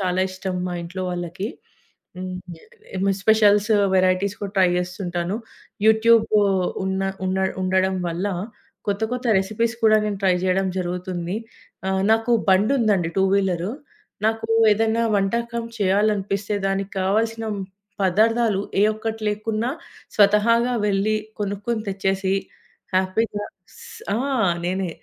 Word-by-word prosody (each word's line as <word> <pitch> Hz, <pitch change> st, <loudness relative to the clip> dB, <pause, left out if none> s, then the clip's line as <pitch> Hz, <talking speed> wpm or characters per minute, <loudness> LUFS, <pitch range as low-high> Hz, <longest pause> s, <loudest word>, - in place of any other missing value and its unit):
చాలా 185 Hz, -1 st, 0 dB
ఇష్టం 185 Hz, 0 st, -4 dB
మా 180 Hz, -, -3 dB
ఇంట్లో 185 Hz, +2 st, -6 dB
వాళ్లకి. 175 Hz, +3 st, -4 dB, 0.7 s
హ్మ్ 185 Hz, 0 st, -5 dB, 0.6 s
ఎమ్ 195 Hz, +1 st, 0 dB
స్పెషల్స్, 210 Hz, 0 st, +4 dB, 0.2 s
వెరైటీస్ 185 Hz, +2 st, +2 dB
కూడా 200 Hz, -1 st, -5 dB
ట్రై 185 Hz, -, +6 dB
చేస్తుంటాను. 180 Hz, +1 st, -3 dB, 0.5 s
యూట్యూబ్ 220 Hz, +1 st, +5 dB, 0.6 s
ఉన్న 190 Hz, 0 st, -1 dB, 0.2 s
ఉన్న 185 Hz, +1 st, 0 dB, 0.2 s
ఉండడం 190 Hz, 0 st, +1 dB
వల్ల 170 Hz, +4 st, -2 dB, 0.6 s
కొత్త 205 Hz, +2 st, -1 dB
కొత్త 250 Hz, 0 st, -3 dB
రెసిపీస్ 220 Hz, +4 st, -1 dB
కూడా 215 Hz, 0 st, +6 dB
నేను 205 Hz, -2 st, -2 dB
ట్రై 185 Hz, -1 st, +4 dB
చేయడం 190 Hz, +1 st, +1 dB
జరుగుతుంది. 180 Hz, +1 st, -3 dB, 0.5 s
ఆహ్, 190 Hz, 0 st, +1 dB
నాకు 225 Hz, +2 st, +1 dB, 0.2 s
బండి 200 Hz, +7 st, +4 dB
ఉందండి, 195 Hz, -7 st, +2 dB
టూ 190 Hz, -, +4 dB
వీలర్. 185 Hz, -2 st, 0 dB, 0.6 s
నాకు 225 Hz, 0 st, -1 dB, 0.2 s
ఏదైనా 225 Hz, +2 st, +1 dB
వంటకం 235 Hz, +4 st, -1 dB
చేయాలనిపిస్తే 205 Hz, 0 st, +1 dB
దానికి 195 Hz, 0 st, -2 dB
కావాల్సిన 225 Hz, +4 st, 0 dB, 0.6 s
పదార్థాలు 215 Hz, +2 st, +2 dB, 0.2 s
ఏ -, -, +6 dB
ఒక్కటి 225 Hz, 0 st, -4 dB
లేకున్నా 215 Hz, +3 st, -2 dB, 0.5 s
స్వతహాగా 225 Hz, +4 st, +4 dB, 0.2 s
వెళ్లి 205 Hz, +2 st, +1 dB, 0.2 s
కొనుక్కొని 205 Hz, +3 st, -2 dB
తెచ్చేసి 195 Hz, 0 st, 0 dB, 0.6 s
హ్యాపీగా 205 Hz, +3 st, 0 dB, 0.3 s
స్ -, -, -13 dB, 0.3 s
ఆ! -, -, +1 dB, 0.5 s
నేనే 185 Hz, +1 st, -1 dB
200 Hz, 115 wpm, -22 LUFS, 185-220 Hz, 0.7 s, ట్రై